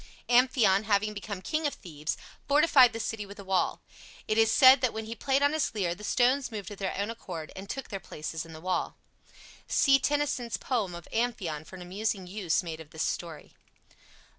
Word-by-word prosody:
Amphion, 240 -5 +4
having 210 0 +1
become 200 -2 -6
king 310 -1 0
of 285 - -4
Thebes, 155 -3 -5 0.3
fortified 285 -4 +6
the 225 - -6
city 225 -1 -3
with 200 +1 -11
a 200 - -9
wall. 190 -1 0 0.4
It 215 - +1
is 225 0 +4
said 260 +2 +8
that 255 -3 +1
when 220 0 -4
he 225 - -5
played 270 +4 +1
on 285 +1 +3
his 310 -6 -1
lyre 180 -5 0
the 210 - -12
stones 255 +5 +2
moved 205 -3 -6
of 205 - -9
their 195 -2 -2
own 200 +3 -1
accord 180 -8 -7
and 195 +1 -9
took 270 0 -5
their 195 - -4
places 160 -1 -6
in 165 - -12
the 155 - -9
wall. 185 +1 -2 0.7
See 275 -1 +4
Tennyson's 285 -5 0
poem 215 -9 -2
of 170 - -10
"Amphion" 195 -10 -2
for 190 - -11
an 180 - -8
amusing 195 +1 -2
use 185 -2 -1
made 165 -2 -6
of 160 -2 -11
this 160 0 -3
story. 165 -3 -4
210 Hz, 205 wpm, -29 LUFS, 185-250 Hz, 0.7 s, said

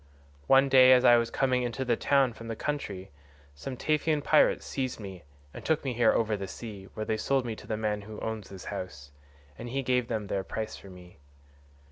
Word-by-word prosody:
One 135 +1 +6
day 130 -1 +7
as 125 0 +4
I 120 - +8
was 115 0 0
coming 130 -2 +1
into 125 +2 -3
the 120 -2 +2
town 135 -1 +2
from 115 0 -10
the 115 - -4
country, 105 -10 -4 0.4
some 125 - -7
Taphian 155 0 0
pirates 155 - +3
seized 130 -3 -3
me 95 -4 -8 0.3
and - - -9
took 160 -1 0
me 130 - -1
here 120 -1 +4
over 110 -2 +1
the 100 -1 -5
sea, 100 -1 -8
where 110 - -3
they 110 - -1
sold 135 +3 0
me 115 -2 -3
to - - -12
the 110 - -2
man 105 -1 -1
who 105 +1 -9
owns 110 -3 -5
this 95 -2 -10
house, 70 -8 -7 0.5
and 120 - -6
he 135 +2 -2
gave 125 -1 +1
them 110 -3 -3
their 100 -1 -2
price 110 +3 -5
for 100 - -13
me. 90 -3 -14
115 Hz, 215 wpm, -28 LUFS, 100-130 Hz, 0.5 s, I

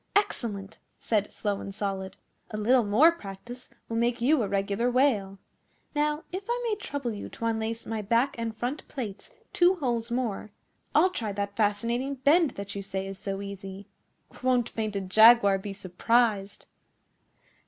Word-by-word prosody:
'Excellent!' 220 - -1 0.2
said 210 -3 0
Slow 205 -2 -2
and 195 - -7
Solid. 195 -2 -3 0.3
'A 215 - -5
little 240 +4 +4
more 230 +11 +6
practice 240 - -9 0.2
will 225 - -3
make 235 +1 +1
you 275 +4 +3
a 210 - 0
regular 200 +4 0
whale. 235 -7 +2 0.6
Now, 300 +1 0
if 375 +2 -3
I 480 +1 +1
may 435 - +1
trouble 280 - -4
you 205 - -7
to 230 - -6
unlace 225 0 -2
my 220 -1 -3
back 230 +6 +1
and 230 -1 -4
front 250 +6 -3
plates 225 - -6 0.2
two 355 +2 +5
holes 240 -7 -1
more, 235 -4 -2 0.5
I'll 375 - +5
try 225 - -3
that 200 0 -3
fascinating 235 +6 0
bend 290 +4 +4
that 200 0 -6
you 200 - -4
say 190 0 -4
is 195 0 -6
so 195 0 -4
easy. 195 0 -8 0.6
Won't 250 -2 +1
Painted 205 -4 -3
Jaguar 220 -2 +7
be 200 +1 -6
surprised! 200 +2 0
225 Hz, 160 wpm, -28 LUFS, 200-250 Hz, 0.6 s, Jaguar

